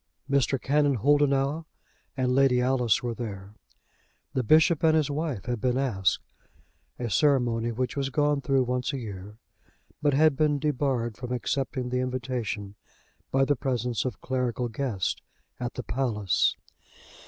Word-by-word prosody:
Mr. 140 -1 +2
Canon 145 +1 +2
Holdenough 145 +4 +2 0.5
and 125 -1 +1
Lady 135 -2 +4
Alice 125 -3 +2
were 120 -1 -2
there. 100 -4 -7 0.8
The 130 - +1
bishop 155 +6 +4
and 160 -1 +5
his 150 -2 +1
wife 145 - -3
had 120 -3 -3
been 125 +1 +1
asked, 100 -10 0 0.7
a 120 - -3
ceremony 120 -1 +2
which 125 +2 -2
was 135 -1 -1
gone 145 +1 +1
through 135 -2 +2
once 125 +2 -1
a - - -2
year, 105 -3 -8 0.6
but 145 -2 +2
had 155 0 +4
been 150 0 +2
debarred 135 -6 -1
from 125 -1 -6
accepting 125 +1 -2
the 125 0 0
invitation 125 -5 -3 0.6
by 135 0 +3
the 145 - +2
presence 125 -4 -1
of 125 -7 -4
clerical 125 -1 -1
guests 110 -6 -2 0.4
at 120 0 -4
the 125 - -4
palace. 110 -8 +1
130 Hz, 145 wpm, -27 LUFS, 120-140 Hz, 0.8 s, and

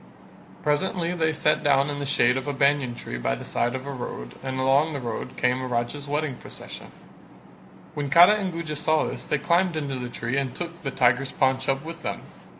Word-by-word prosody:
Presently 170 +3 0
they 160 -2 +1
sat 155 -1 +1
down 140 -1 +3
in 145 - -4
the 140 - -3
shade 125 -3 +3
of 130 +1 -3
a 145 - -1
banyan 140 -3 +2
tree 60 - -6
by - - 0
the - - -8
side 120 +2 0
of 130 +1 -5
a 140 - -4
road 60 - -6
and 130 0 -3
along 140 +4 +3
the 140 - -2
road 120 -3 -5
came 125 +1 +1
a 130 - -3
Raja's 125 +4 -2
wedding 145 -2 -1
procession; - - -9 1.0
when 145 -2 -3
Kara 175 +8 +8
and 200 -3 -1
Guja 165 -2 -4
saw 155 +1 +2
this - - -4
they 150 - +1
climbed 170 +4 +2
into 140 -4 -3
the 125 -1 -4
tree 120 +3 -3
and 135 -2 -1
took 170 -1 -6
the 140 - -2
tiger's 125 +1 +2
paunch 130 0 +1
up 135 +2 0
with 165 0 -7
them. - - -4
140 Hz, 215 wpm, -25 LUFS, 130-155 Hz, 1.0 s, Kara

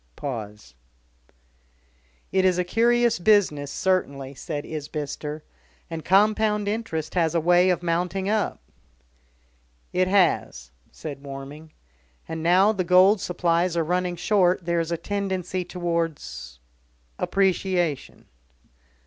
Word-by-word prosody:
Pause. 105 - -7 1.6
"It's 185 -1 +3
a 180 - +1
curious 235 +3 +2
business, 175 -8 +2
certainly," 140 -6 -1
said 145 +1 -5
Isbister. 150 0 -5 0.5
"And 160 -1 -5
compound 210 +2 +2
interest 205 -8 -3
has 170 -2 +1
a - - +4
way 175 +3 +4
of 180 -1 0
mounting 180 +3 -1
up." 215 0 0 1.3
"It 185 0 +2
has," 170 - +1 0.2
said 145 -3 -8
Warming. 140 +3 -9 0.5
"And 160 0 -5
now 185 +5 +4
the 195 -4 -1
gold 185 +3 +5
supplies 170 0 0
are 165 - +2
running 180 +2 -1
short 180 -1 +2
there 170 0 +1
is 165 0 -2
a 170 - 0
tendency 190 -2 -3
towards... 165 - -4 0.6
appreciation." 185 -5 0
175 Hz, 110 wpm, -24 LUFS, 155-190 Hz, 1.6 s, gold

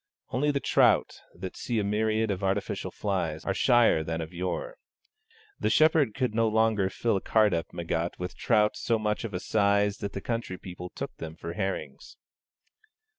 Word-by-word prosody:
Only 145 +4 +1
the 140 -1 +1
trout, - - +3
that 95 +1 -7
see 120 - -3
a 105 - +1
myriad 110 +1 +1
of 100 0 -4
artificial 100 +1 -1
flies, 85 -6 -2
are 95 - 0
shyer 120 -7 +4
than 80 +1 -3
of 80 +1 -6
yore. 95 - -3 0.8
The - - +1
Shepherd 155 -7 +4
could 125 -5 0
no 115 0 +2
longer 110 -3 +2
fill 110 +2 0
a - - -4
cart 110 -3 +3
up 85 -1 -2
Meggat 85 0 -2
with 90 0 -5
trout 105 -2 +2
so 115 - 0
much 105 -1 -1
of 105 -5 -5
a - - -1
size 100 0 +2
that 100 - -4
the - - -3
country 115 -5 -3
people 90 -1 -8
took - - -6
them 80 -1 -7
for 85 +1 -6
herrings. 95 -1 -4
100 Hz, 180 wpm, -28 LUFS, 90-110 Hz, 0.8 s, shyer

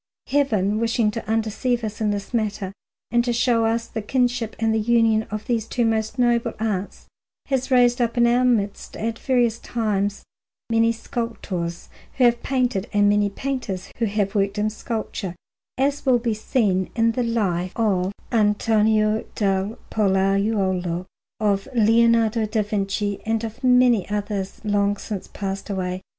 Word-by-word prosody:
Heaven, 215 -8 +1
wishing 230 -1 +1
to 230 - -6
undeceive 225 +2 0
us 215 0 -5
in 215 - +2
this 205 +2 -4
matter 210 -4 -1 0.4
and 240 0 +3
to 240 - 0
show 235 -1 +2
us 230 +1 0
the 225 -1 -5
kinship 245 0 0
and 220 0 +1
union 225 -2 +3
of 215 +1 -5
these 230 -2 -1
two 240 0 0
most 220 +1 0
noble 240 -1 +2
arts, 205 -3 -3 0.4
has 265 -2 0
raised 245 -1 +4
up 235 +1 0
in 240 - +5
our 240 +1 +3
midst 215 -5 0
at 230 +1 -3
various 240 -3 +1
times 205 -3 -1 0.5
many 230 0 +4
sculptors 225 -7 -4 0.3
who 260 - +3
have 240 -1 +4
painted 250 -6 -1
and 205 -1 +4
many 205 0 +3
painters 230 -5 -4
who 230 - +2
have 205 -1 -1
worked 200 -1 0
in 210 +1 0
sculpture, 215 -4 -4 0.4
as 280 +2 0
will 260 -3 +4
be 235 -1 -1
seen 210 -4 0
in 230 0 +3
the 250 - -2
Life 195 -7 0
of 195 -5 +1 0.2
Antonio 215 0 +2
del 195 +1 0
Pollaiuolo, 195 -3 +1 0.3
of 205 -1 +1
Leonardo 230 0 +3
da 215 0 0
Vinci, 205 0 -2
and 225 0 -1
of 225 +3 -7
many 250 -6 +4
others 205 -2 -3
long 205 -1 +1
since 200 -1 -6
passed 195 0 -5
away. 185 -1 -3
220 Hz, 155 wpm, -23 LUFS, 200-235 Hz, 0.5 s, in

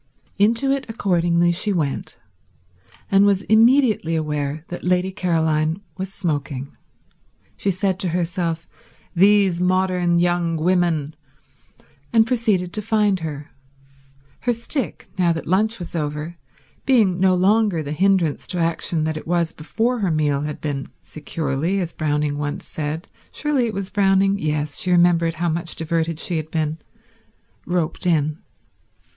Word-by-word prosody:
Into 230 +6 +3
it 275 -1 -1
accordingly 175 -5 +2
she 185 +5 0
went, 155 -7 -2 0.9
and 195 0 +5
was 200 -1 +3
immediately 225 - +4
aware 150 0 -2
that 175 - -6
Lady 180 +1 +1
Caroline 160 -3 0 0.2
was 190 +2 -5
smoking. 145 -7 -3 0.8
She 200 - -1
said 190 0 0
to 185 - -1
herself, 170 -1 -2 0.5
"These 195 -1 +4
modern 180 -1 +2
young 175 -1 +1
women," 165 -3 +1 1.0
and 225 -1 +5
proceeded 220 -7 0
to 215 - -1
find 210 -3 +1
her; 150 -3 -6 0.9
her 245 - 0
stick, 235 +3 -4
now 175 -2 +4
that 165 - -5
lunch 215 +5 +1
was 175 -1 -7
over, 150 +1 -3 0.5
being 215 -9 +3
no 185 0 +4
longer 195 -2 +2
the 145 - -5
hindrance 185 -2 +1
to 180 - -3
action 165 -1 0
that 155 0 -1
it 155 - -9
was 170 -1 0
before 230 +10 -1
her 195 -4 0
meal 150 -3 +1
had 150 0 -4
been 140 -3 -3 0.2
securely, 155 +4 -2
as 175 -3 -3
Browning 150 -1 -1
once 145 0 -4
said—surely 180 - -3
it 220 - -4
was 195 -1 -4
Browning? 195 0 +3
Yes, 150 -2 -1
she 185 - 0
remembered 175 -2 +3
how 170 +2 -1
much 170 +1 -2
diverted 165 0 -1
she 175 0 -1
had 155 0 -4
been—roped 160 +2 -5
in. 155 -2 +1
175 Hz, 140 wpm, -21 LUFS, 155-195 Hz, 1.0 s, and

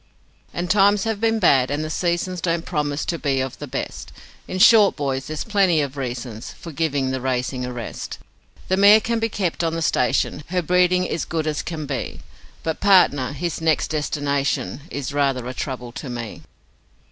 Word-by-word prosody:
'And 175 +1 -3
times 200 +1 +4
have 225 -2 -2
been 225 0 +2
bad, 135 -10 +4
and 145 +2 -1
the 155 - -4
seasons 175 +1 -1
Don't 170 -1 -1
promise 150 -3 -2
to 170 - -2
be 140 -3 0
of 130 -1 -3
the - - -6
best; - - -5 0.4
In 185 - -4
short, 210 +1 +7
boys, 135 -2 -2
there's 155 -1 -4
plenty 195 -6 +2
of 140 -2 -2
reasons 120 -4 -5
For 170 - -10
giving 140 -4 0
the 130 -1 -3
racing 125 0 -1
a - - -5
rest. 120 -3 -6 0.5
The 190 - +1
mare 205 +2 +8
can 230 +1 -1
be 225 0 0
kept 180 -5 -2
on 165 0 0
the 165 - -2
station 145 +1 +1
Her 180 0 -1
breeding 180 +2 +3
is 165 - -2
good 160 -1 -2
as 155 -1 -1
can 160 -3 -5
be 135 -2 -4 0.4
But 160 -1 -2
Partner, 180 -10 +4
his 165 +3 -3
next 160 -2 +1
destination 145 -6 -1
Is 140 0 -4
rather 135 -4 0
a 125 - -4
trouble 125 -2 -5
to 135 +2 -7
me. 120 -3 -6
155 Hz, 190 wpm, -22 LUFS, 135-180 Hz, 0.5 s, mare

